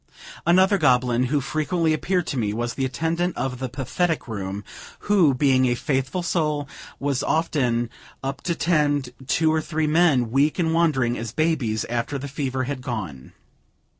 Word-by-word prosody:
Another 190 +3 +5
goblin 125 -4 +3
who 145 +4 +1
frequently 155 +4 0
appeared 175 +3 0
to - - -3
me, 105 -4 0
was 120 +1 -2
the 135 +2 -1
attendant 165 +7 -1
of 130 0 -2
the 130 -1 -3
pathetic 145 +6 -1
room, 100 -2 -4 0.4
who, 180 -10 +3
being 130 -1 +3
a 120 - +1
faithful 135 +6 -1
soul, 150 -4 0 0.3
was 140 -2 0
often 125 -7 +1 0.4
up 135 +1 -4
to 170 - -1
tend 145 -7 +1
two 160 +1 +2
or 160 - +1
three 155 0 -1
men, 150 -7 +3
weak 140 +4 +2
and 165 -3 +1
wandering 135 -8 +2
as 115 -1 -5
babies, 135 -8 0
after 120 +4 -2
the 140 +1 -6
fever 135 -2 -2
had 130 0 -4
gone. 95 - -6
140 Hz, 165 wpm, -23 LUFS, 125-160 Hz, 0.4 s, Another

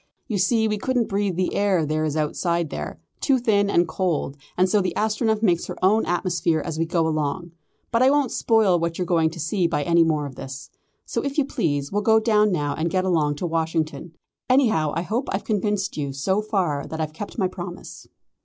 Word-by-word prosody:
You 210 -5 -1
see 220 +4 +2
we 210 -1 -1
couldn't 250 0 0
breathe 200 -2 0
the 185 +1 -1
air 190 -5 +2
there 155 +1 -1
is 155 0 -2
outside 170 +1 -1
there 75 +1 -5 0.2
too 270 - +2
thin 205 -4 +2
and 175 -3 +3
cold 165 -5 -1 0.2
and 185 +1 +4
so 200 +2 +2
the 185 -2 -2
Astronef 220 0 0
makes 175 -5 +2
her - - -6
own 215 +4 +3
atmosphere 175 -2 0
as 160 0 -4
we 165 - 0
go 165 -1 +1
along. 155 +3 -2 0.4
But 230 0 +2
I 260 - +6
won't 285 -3 +2
spoil 215 -6 +3
what 165 0 -2
you're 180 - -1
going 165 -2 +2
to 165 +2 -10
see 170 +3 0
by 150 -3 -1
any 170 +3 +4
more 155 -2 0
of 140 - -7
this. 135 +2 -8 0.3
So - - -2
if 280 0 -3
you 295 - +3
please, 145 - -1
we'll 205 - 0
go 220 +1 +4
down 215 -2 +3
now 145 -5 0
and 165 +2 -1
get 185 +1 0
along 155 -5 +1
to 160 - -4
Washington. 160 0 -2 0.3
Anyhow, 220 - +3
I 165 - -1
hope 235 +8 -2
I've 195 - -2
convinced 205 -2 -1
you 140 -2 -3
so 190 +10 0
far 185 -9 -1
that 160 - -6
I've 155 -1 -3
kept 200 +6 -7
my 190 -4 +2
promise." 175 -1 -8
180 Hz, 220 wpm, -23 LUFS, 160-210 Hz, 0.4 s, I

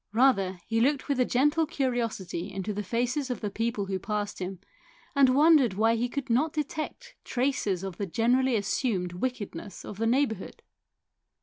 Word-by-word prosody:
Rather 205 -7 +3
he 225 +1 0
looked 275 +2 +2
with 280 -3 0
a 250 - +4
gentle 295 +6 +2
curiosity 230 - -2
into 195 +2 -3
the 205 - -2
faces 245 +6 -1
of 250 - -2
the 210 - -3
people 225 -1 -1
who 190 -1 -2
passed 205 +1 -3
him, 185 +1 -4 0.6
and 265 -2 +5
wondered 290 - +5
why 225 +3 +3
he 240 +2 -1
could 280 +1 -4
not 265 +6 +2
detect 305 0 -4
traces 245 -8 0
of 190 -3 -5
the 200 - -3
generally 245 +6 +2
assumed 200 -3 -1
wickedness 210 -2 -5
of 200 - -8
the 225 - +1
neighbourhood. 235 -5 0
230 Hz, 170 wpm, -28 LUFS, 200-265 Hz, 0.6 s, and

